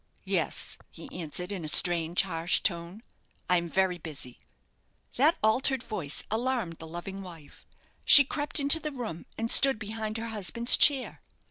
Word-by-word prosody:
"Yes," - - -1
he - - -12
answered, 180 - -6
in 190 -4 -6
a - - -6
strange, 170 +2 +1
harsh 170 -2 0
tone, 175 +3 -2 0.4
"I 180 - +3
am 170 0 -3
very 185 0 -1
busy." 145 -6 -8 0.8
That 295 +6 +2
altered 255 +3 +1
voice 165 -10 -4
alarmed 225 -7 -3
the 160 - -10
loving 175 +4 -8
wife. 165 -6 -14 0.4
She 285 - +9
crept 290 +2 -3
into 285 +3 +3
the 305 -1 -6
room, 230 - -8
and 225 +1 -2
stood 270 -4 +6
behind 215 0 -6
her 230 +1 -6
husband's 225 +3 +2
chair. 275 -4 +2
200 Hz, 155 wpm, -27 LUFS, 170-245 Hz, 0.8 s, She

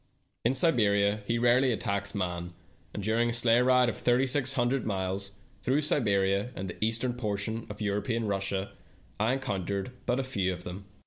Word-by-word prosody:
In 120 +3 +2
Siberia 105 -8 +3
he 115 - +1
rarely 120 +2 +4
attacks 100 -2 -2
man, 90 -3 -2 0.4
and 105 - -5
during 115 +3 +2
a - - -1
sleigh 115 0 +4
ride 125 0 +4
of 120 - -1
thirty 125 +2 +2
six 135 0 0
hundred 125 0 +1
miles 100 -1 -3 0.3
through 135 +4 +1
Siberia 100 -7 +1
and 95 - -4
the 90 - -4
eastern 115 +3 0
portion 110 -1 -3
of 105 +1 -8
European 105 +3 -1
Russia 100 -1 -2 0.5
I 110 +4 +2
encountered 100 -4 -3 0.2
but 130 +2 +1
few 100 -8 -1
of 90 -1 -6
them. 95 +3 -7
110 Hz, 170 wpm, -29 LUFS, 100-125 Hz, 0.5 s, rarely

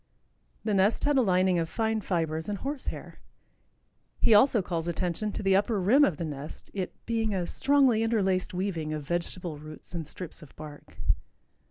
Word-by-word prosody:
The 215 - 0
nest 195 +3 +3
had 290 0 +3
a 265 - +5
lining 185 -4 +3
of 165 -1 -2
fine 220 +1 0
fibers 160 -2 -1
and 205 - -2
horse 275 +5 -5
hair. - - -6 1.0
He - - +5
also 215 -1 +5
calls 170 -2 -3
attention 180 +4 -1
to - - -3
the 195 -1 +4
upper 205 +2 +2
rim 235 +11 +5
of 180 - +2
the 170 - -3
nest, 145 0 -8
it 190 -3 -4
"being 225 -3 0
a 180 -2 -1
strongly 270 -1 +3
interlaced 195 -5 +1
weaving 180 -5 -2
of 150 -2 -4
vegetable 175 -2 -2
roots 155 +3 -11
and 165 -4 -4
strips 180 +2 -7
of 150 - -14
bark." 150 -1 -11
185 Hz, 180 wpm, -28 LUFS, 165-220 Hz, 1.0 s, a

